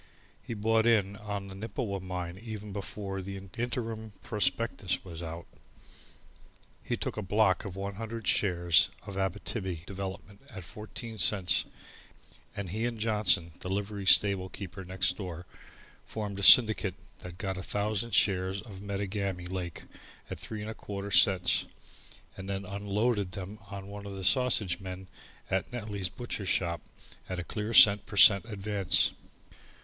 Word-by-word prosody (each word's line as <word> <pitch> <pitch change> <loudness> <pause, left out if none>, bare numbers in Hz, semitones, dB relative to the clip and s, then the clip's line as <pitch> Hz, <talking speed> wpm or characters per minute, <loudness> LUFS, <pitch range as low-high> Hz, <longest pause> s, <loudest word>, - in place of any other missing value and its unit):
He 115 - -6
bought 110 +2 +2
in 100 -4 +3
on 100 -1 -5
the 95 - -9
Nippewa 100 0 -3
mine 90 -2 -5
even 105 -1 -7
before 100 -1 -5
the 95 +1 -6
interim 110 +2 -4
prospectus 100 -2 0
was 85 -2 -7
out. 85 0 -6 1.4
He - - -2
took - - -4
a - - -1
"block" 105 0 +2
of 95 -3 -6
100 100 +2 -5
shares 85 -5 +3 0.2
of 100 - -7
Abbitibbi 95 -2 -3
Development 95 +1 -7
at 100 -7 -8
fourteen 110 +3 -8
cents, 95 -2 +3 0.9
and 100 -4 -4
he 110 +4 -1
and 120 -1 -4
Johnson, 105 -6 +2
the 90 - -5
livery 100 0 -3
stablekeeper 95 -1 +2
next 95 -1 0
door, 90 -3 -6 0.6
formed 105 -2 -5
a - - -3
syndicate 110 -4 +8 0.3
and 90 -1 -8
got 95 -1 -3
a - - -4
thousand 105 +3 -1
shares 95 0 +3
of 100 -3 -10
Metagami 100 -2 -3
Lake 90 -2 -5 0.5
at - - -5
3 110 -2 -5
1/4 100 -2 -6
cents 90 0 +5 0.7
and 95 +1 -7
then 100 0 -3
"unloaded" 100 +1 -1
them 100 +1 -6
on 100 -1 -7
one 100 0 -8
of 100 - -6
the 95 - -6
sausage 95 -2 +3
men 95 -1 -7 0.4
at 95 +4 0
Netley's 105 -6 -3
butcher 105 -1 -5
shop 85 -3 0 0.5
at 90 - -3
a 90 - -3
clear 105 +4 -4
cent 105 -2 +8
per 100 - -7
cent 100 +2 +8
advance. 100 -4 +1
100 Hz, 145 wpm, -30 LUFS, 95-105 Hz, 1.4 s, syndicate